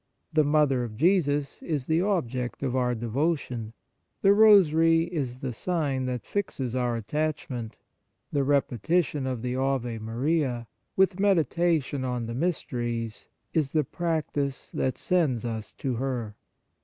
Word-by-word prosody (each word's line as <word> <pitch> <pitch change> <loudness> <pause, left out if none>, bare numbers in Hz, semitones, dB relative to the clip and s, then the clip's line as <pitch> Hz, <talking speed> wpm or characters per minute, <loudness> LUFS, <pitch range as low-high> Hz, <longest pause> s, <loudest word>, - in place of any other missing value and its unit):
The 155 -1 +4
Mother 145 -4 +3
of 110 -3 -6
Jesus 145 - +2
is 150 -6 -2
the 160 +3 +2
object 130 - -1
of 130 -2 -1
our 125 -1 +1
devotion; 120 -1 -2 0.5
the 195 0 +7
Rosary 165 -6 +6
is 145 -8 -3
the 130 -2 -3
sign 140 -3 -1
that 125 -4 -3
fixes 140 - -3
our 125 -2 0
attachment; 130 -1 -3 0.6
the 140 - +2
repetition 140 - +1
of 125 -3 -3
the 125 0 -2
Ave 130 -3 -1
Maria, 120 +2 -1 0.3
with 190 -1 +3
meditation 170 -7 +2
on 125 -2 -2
the 115 - -5
mysteries, 120 -7 -2 0.2
is 150 -5 0
the 155 -1 +3
practice 150 -3 -2
that 130 - -1
sends 150 -11 +1
us 110 -2 -4
to 135 -2 -3
her. 120 -5 -3
135 Hz, 135 wpm, -27 LUFS, 125-165 Hz, 0.6 s, the